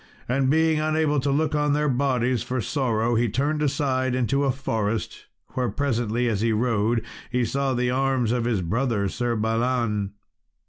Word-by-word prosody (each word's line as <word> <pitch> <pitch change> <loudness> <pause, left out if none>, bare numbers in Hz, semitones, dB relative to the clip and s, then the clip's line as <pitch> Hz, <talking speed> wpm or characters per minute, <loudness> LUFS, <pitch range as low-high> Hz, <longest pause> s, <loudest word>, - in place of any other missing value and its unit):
And 130 +1 +1
being 160 +1 +3
unable 155 -1 +1
to 140 +2 -1
look 150 +2 +1
on 150 -1 +2
their 150 +1 +1
bodies 130 -2 +1
for 130 0 -2
sorrow, 120 -2 0
he 115 0 +2
turned 145 +7 0
aside 130 -3 0
into 130 +3 +1
a 135 - +3
forest, 115 -4 -3 0.2
where 125 -2 -1
presently 120 -1 0
as 105 -4 0
he 115 0 +2
rode, 115 0 +1 0.2
he 125 -1 +1
saw 135 +2 -1
the 125 0 +1
arms 130 -3 +1
of 120 -1 0
his 115 -5 0
brother, 105 +2 0
Sir 120 +1 -1
Balan. 110 -2 0
125 Hz, 170 wpm, -24 LUFS, 115-140 Hz, 0.2 s, being